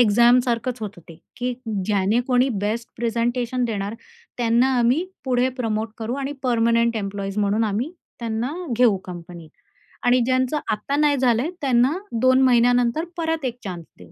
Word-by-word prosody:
एक्झामसारखंच 240 +2 +3
होतं 205 -4 -6
ते, 165 - -11 0.2
की 250 0 -2 0.3
ज्याने 205 +3 +2
कोणी 250 +1 +3 0.2
बेस्ट 230 +3 -2
प्रेझेंटेशन 240 +2 -1
देणार, 205 -2 -3 0.4
त्यांना 240 +2 +3
आम्ही 250 +9 +2 0.2
पुढे 255 0 +2
प्रमोट 220 -2 -1
करू 225 +3 -3
आणि 275 +1 -3
पर्मनंट 235 -1 +2
एम्प्लॉईज 200 0 -4
म्हणून 210 +2 +2
आम्ही 225 - -2 0.3
त्यांना 230 +4 -2 0.2
घेऊ 235 -5 +4
कंपनीत 175 -2 -9 0.6
आणि 245 +1 +5
ज्यांचं 255 +3 +1
आता 215 +7 -2
नाही 295 -1 +3
झालं 245 -2 +3
आहे, 325 +6 -2
त्यांना 260 +3 +3 0.2
2 260 +1 +5
महिन्यानंतर 245 +3 +3
परत 325 -3 -1
1 245 -1 -3
चान्स 175 -4 -6
देऊ. 90 -2 -15
235 Hz, 150 wpm, -22 LUFS, 215-255 Hz, 0.6 s, आणि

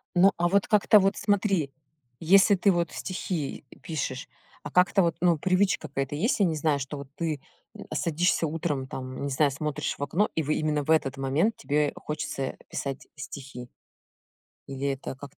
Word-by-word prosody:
Ну, 190 +3 +6
а 175 - +2
вот, 200 +2 +2
как-то 210 0 +5
вот, 195 0 +1
смотри, 195 -7 +1 0.5
если 195 +4 +6
ты 195 +2 +3
вот 175 -1 0
стихи, 180 -5 -4
и, - - -13
э, - - -22
пишешь, 150 -1 -4 0.3
а, - - -7
как-то 180 +2 +4
вот, 170 -2 +1
ну, 175 -2 +4
привычка 185 0 +1
какая-то 135 0 -3
есть, 225 - +1
я 200 - +5
не 165 -3 0
знаю, 150 -2 +1
что 140 +2 -5
вот 140 -1 -8
ты, 160 -4 -2 0.3
м, - - -9
а, - - -5
садишься 170 +1 +1
утром, 150 -4 -2
там, 130 0 -6
не 140 - -1
знаю, 140 +1 +2
смотришь 150 +1 -3
в - - -3
окно, 185 +9 +1
и, 160 - +1
в 145 - -7
э - - +4
именно 150 -1 0
в 155 - 0
этот 140 -4 +2
момент 145 +11 +1
тебе 150 0 +1
хочется, 150 -2 -4
э, 130 - -4
писать 135 -1 -5
стихи? 135 -3 -8 1.0
Или, 135 0 -3
это 135 0 -5
как-то 140 +1 -12
155 Hz, 200 wpm, -27 LUFS, 140-180 Hz, 1.0 s, Ну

